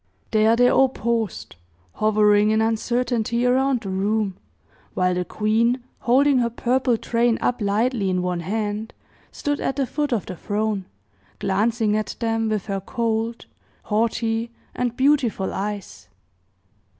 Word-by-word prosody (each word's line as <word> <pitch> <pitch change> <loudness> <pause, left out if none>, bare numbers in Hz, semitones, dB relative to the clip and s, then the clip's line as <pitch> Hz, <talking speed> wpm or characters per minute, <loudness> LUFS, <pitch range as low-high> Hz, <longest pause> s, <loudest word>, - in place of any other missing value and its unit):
There 220 +1 +4
they 245 +1 +5
all 265 +1 +4
paused, 230 - -3 0.4
hovering 210 -1 +3
in 220 0 +2
uncertainty 235 +1 0
around 260 0 +2
the 195 -4 -5
room, 200 +1 0 0.6
while 180 0 +2
the 180 0 -1
queen, 230 +6 +1 0.2
holding 265 +2 +3
her 235 -1 +1
purple 245 +1 +1
train 235 0 +1
up 245 -1 -1
lightly 210 +1 +1
in 180 -1 0
one 180 -1 -1
hand, 210 +4 -3 0.4
stood 290 0 -2
at 270 - -1
the 275 -1 0
foot 290 +2 -2
of 230 -5 0
the 185 - -6
throne, 205 +1 -2 0.5
glancing 215 +2 +1
at 215 0 -2
them 225 -1 0
with 215 -3 -1
her 195 -2 -3
cold, 230 +2 -2 0.4
haughty 225 +1 0 0.2
and 245 -1 -2
beautiful 260 -8 +2
eyes. 195 - -5
225 Hz, 140 wpm, -23 LUFS, 205-240 Hz, 0.6 s, they